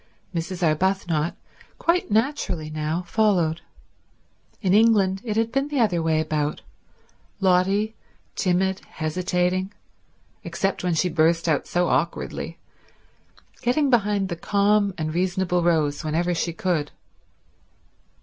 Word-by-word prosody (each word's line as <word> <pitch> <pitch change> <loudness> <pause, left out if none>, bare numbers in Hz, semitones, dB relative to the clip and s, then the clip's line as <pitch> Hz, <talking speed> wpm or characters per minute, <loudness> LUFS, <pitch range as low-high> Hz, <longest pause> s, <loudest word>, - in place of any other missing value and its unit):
Mrs. 175 +2 -3
Arbuthnot, 170 -1 0 0.4
quite 345 +2 +1
naturally 215 - 0
now, 155 +3 -2
followed. 175 -5 +1 1.0
In 190 -3 +1
England 205 -3 +4
it 220 -3 -2
had 225 0 +1
been 275 +3 0
the 295 -2 -2
other 190 -8 +2
way 160 -1 +1
about—Lotty, 185 +6 -2 0.4
timid, 190 +1 +1
hesitating, 180 +3 -1 0.7
except 195 -1 -2
when 180 -2 +1
she 180 - +2
burst 165 0 +2
out 155 -3 +1
so 175 0 +1
awkwardly, 155 +6 -2 1.0
getting 265 +3 +2
behind 205 -4 +2
the 170 - -2
calm 200 +3 +2
and 155 -2 -3
reasonable 180 0 0
Rose 160 -3 +1
whenever 165 +3 0
she 170 0 -1
could. 165 -3 -1
180 Hz, 110 wpm, -24 LUFS, 165-200 Hz, 1.0 s, England